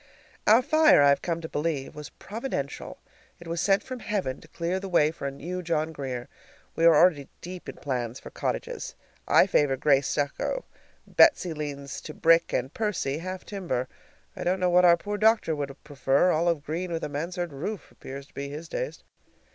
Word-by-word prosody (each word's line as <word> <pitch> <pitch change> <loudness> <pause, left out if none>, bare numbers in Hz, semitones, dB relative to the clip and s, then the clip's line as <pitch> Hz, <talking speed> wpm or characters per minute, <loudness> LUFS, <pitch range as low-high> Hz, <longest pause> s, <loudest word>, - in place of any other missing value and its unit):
Our 225 +4 +7
fire, 310 - +5
I 140 - +6
have 140 - +3
come 170 -1 -2
to 160 - -5
believe, 150 -3 -2
was 150 -1 -8
providential. 210 - -5 0.4
It 170 - -12
was 170 +1 -2
sent 195 -1 +3
from 255 -1 -7
heaven 200 - -3
to - - -15
clear 175 +2 -2
the 195 0 -6
way 155 -4 +4
for 150 -3 -5
a - - -3
new 175 +7 -5
John 160 -2 -1
Grier. 130 -5 -5 0.5
We 165 - +2
are 165 -1 +8
already 150 -3 +4
deep 180 0 -8
in - - -7
plans 125 -3 -3
for - - -11
cottages. - - -4 0.3
I - - +6
favor 135 -2 +2
gray 140 0 +4
stucco, 145 - -2 0.4
Betsy 185 - +4
leans 140 -2 -5
to 155 - -9
brick, 165 0 +4
and 130 +2 -2
Percy, 190 -10 -1
half 185 +2 -6
timber. 170 -11 -3 0.5
I - - -5
don't 185 +2 +1
know 180 -1 +2
what 180 +1 +6
our 170 -1 +7
poor 205 +3 -4
doctor 220 -7 +3
would 140 -1 -6
prefer; 145 +3 +2
olive 165 -2 +1
green 170 +4 -3
with 165 -1 -3
a - - -1
mansard 170 +3 -4
roof 180 +9 -5
appears 135 +1 -9
to - - -27
be 140 0 -5
his 155 +3 -7
taste. - - -4
165 Hz, 195 wpm, -27 LUFS, 140-185 Hz, 0.5 s, are